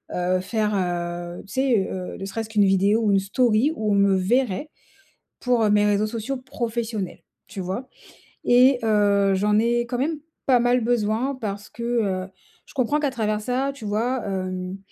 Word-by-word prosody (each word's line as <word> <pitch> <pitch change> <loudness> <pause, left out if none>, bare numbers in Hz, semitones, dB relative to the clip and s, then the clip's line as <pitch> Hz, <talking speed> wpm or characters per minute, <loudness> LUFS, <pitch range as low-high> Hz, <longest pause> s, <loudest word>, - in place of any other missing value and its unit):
heu, 180 +1 +1
faire, 210 +2 -1
heu, 175 -1 -3
tu 195 - -11
sais, 255 -7 +2
heu, 185 -1 -5
ne 195 - -6
serait-ce 220 +2 -5
qu'une 210 -2 +3
vidéo 195 +3 +3
ou 210 - +3
une 195 - +4
story 225 +6 +2
où 215 -6 -1
on - - +3
me 200 -1 +4
verrait 235 +7 0 0.7
pour, 245 -2 +1
heu, 210 - +3
mes 210 0 +4
réseaux 205 0 +2
sociaux 230 +5 -4
professionnels, 235 -6 -4 0.2
tu - - -8
vois? 190 +8 -4 0.6
Et 250 +1 +5
heu, 205 -2 +3
j'en 210 +2 +2
ai 235 +1 +2
quand 240 +1 -3
même 305 +3 -1 0.3
pas 255 -2 +5
mal 245 +1 +2
besoin 235 +3 0
parce 205 -5 -5
que, 235 - -8
heu, 205 -6 0 0.4
je - - -17
comprends 275 +2 +1
qu'à 290 -2 0
travers 215 -4 -1
ça, 255 +5 -1
tu 265 -6 -10
vois, 230 +5 -1
hem, 185 -1 -3
215 Hz, 180 wpm, -23 LUFS, 195-245 Hz, 0.7 s, Et